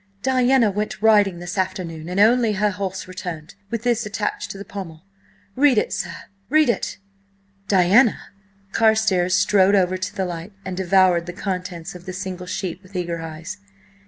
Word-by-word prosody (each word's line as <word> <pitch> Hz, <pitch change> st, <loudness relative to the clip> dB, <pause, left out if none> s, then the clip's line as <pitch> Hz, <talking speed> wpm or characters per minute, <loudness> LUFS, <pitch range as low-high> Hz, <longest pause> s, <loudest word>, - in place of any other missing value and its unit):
"Diana 255 Hz, -3 st, +3 dB
went 210 Hz, +1 st, -3 dB
riding 205 Hz, -4 st, +4 dB
this 175 Hz, +2 st, -5 dB
afternoon, 175 Hz, -3 st, -3 dB
and 180 Hz, +2 st, -2 dB
only 225 Hz, +1 st, +4 dB
her 210 Hz, +1 st, +1 dB
horse 190 Hz, -1 st, -4 dB
returned–with 185 Hz, +5 st, -7 dB
this 240 Hz, -1 st, +1 dB
attached 210 Hz, 0 st, -3 dB
to -, -, -7 dB
the 200 Hz, -, -8 dB
pommel! 165 Hz, -5 st, -8 dB, 0.5 s
Read 270 Hz, -3 st, +4 dB
it, -, -, +1 dB
sir! 170 Hz, -2 st, -4 dB, 0.3 s
Read 310 Hz, -1 st, +4 dB
it!" -, -, -4 dB, 0.7 s
"Diana!" 200 Hz, +5 st, +5 dB, 0.5 s
Carstares 220 Hz, -5 st, +3 dB
strode 195 Hz, +1 st, +4 dB
over 185 Hz, -1 st, +2 dB
to 185 Hz, -, -5 dB
the 190 Hz, -, -1 dB
light, 175 Hz, +2 st, -6 dB
and 185 Hz, -1 st, -4 dB
devoured 185 Hz, -2 st, +3 dB
the 175 Hz, -, -5 dB
contents 180 Hz, -3 st, -5 dB
of 180 Hz, +1 st, -12 dB
the 185 Hz, -, -4 dB
single 185 Hz, -1 st, -6 dB
sheet, 185 Hz, -1 st, -4 dB
with 190 Hz, 0 st, -18 dB
eager 170 Hz, -2 st, -2 dB
eyes. 160 Hz, +5 st, -7 dB
190 Hz, 160 wpm, -22 LUFS, 180-210 Hz, 0.7 s, Diana